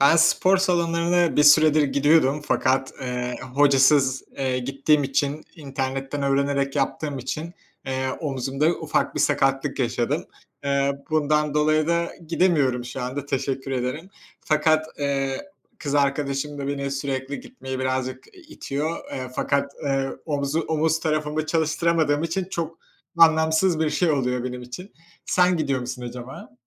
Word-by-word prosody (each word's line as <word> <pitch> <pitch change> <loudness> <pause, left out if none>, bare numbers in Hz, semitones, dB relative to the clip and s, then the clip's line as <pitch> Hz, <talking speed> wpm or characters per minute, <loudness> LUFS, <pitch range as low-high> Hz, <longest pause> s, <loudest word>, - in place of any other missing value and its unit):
Ben 140 +4 +6
spor 185 +3 +4
salonlarına 175 -2 +1
bir 150 - +5
süredir 155 +1 +6
gidiyordum 145 0 +3
fakat, 135 0 +1
eee, 125 -1 -3 0.2
hocasız, 135 -1 +4
eee, 130 -2 0
gittiğim 140 +3 +1
için 140 +2 -1
internetten 135 -1 -4
öğrenerek 140 0 0
yaptığım 140 +1 -1
için, 155 +7 -5 0.3
eee, 130 0 -1
omzumda 140 +2 0
ufak 155 -2 -1
bir - - -1
sakatlık 135 -1 +1
yaşadım. 130 +5 -1 0.4
Eee, 140 0 0
bundan 150 -1 +1
dolayı 155 +1 +2
da 170 0 0 0.2
gidemiyorum 150 -8 +2
şu 125 +1 -6
anda. 130 +3 -4
Teşekkür 135 -1 -2
ederim. 130 +8 -3 0.3
Fakat, 155 -1 +2
eee, 140 - -1 0.3
kız 145 -1 -3
arkadaşım 140 0 0
da 140 - -4
beni 140 0 -2
sürekli 135 0 -3
gitmeye 130 - -7
birazcık 130 0 -2
i 370 - -15
itiyor. 160 - -4 0.2
Eee, 130 -1 -4
fakat, 140 0 0
eee, 135 -1 0 0.2
omuzu 145 0 -1
omuz 160 0 0
tarafımı 155 -1 -1
çalıştıramadığım 160 -1 +1
için 165 +3 -1
çok 170 -2 -5 0.4
anlamsız 160 +1 +4
bir 155 -1 +1
şey 175 +1 +1
oluyor 125 -4 0
benim 125 0 -5
için. 125 - -9 0.3
Sen 180 0 +3
gidiyor 140 -5 0
musun 125 0 -6
acaba? 125 +1 -9
140 Hz, 135 wpm, -24 LUFS, 135-155 Hz, 0.4 s, Ben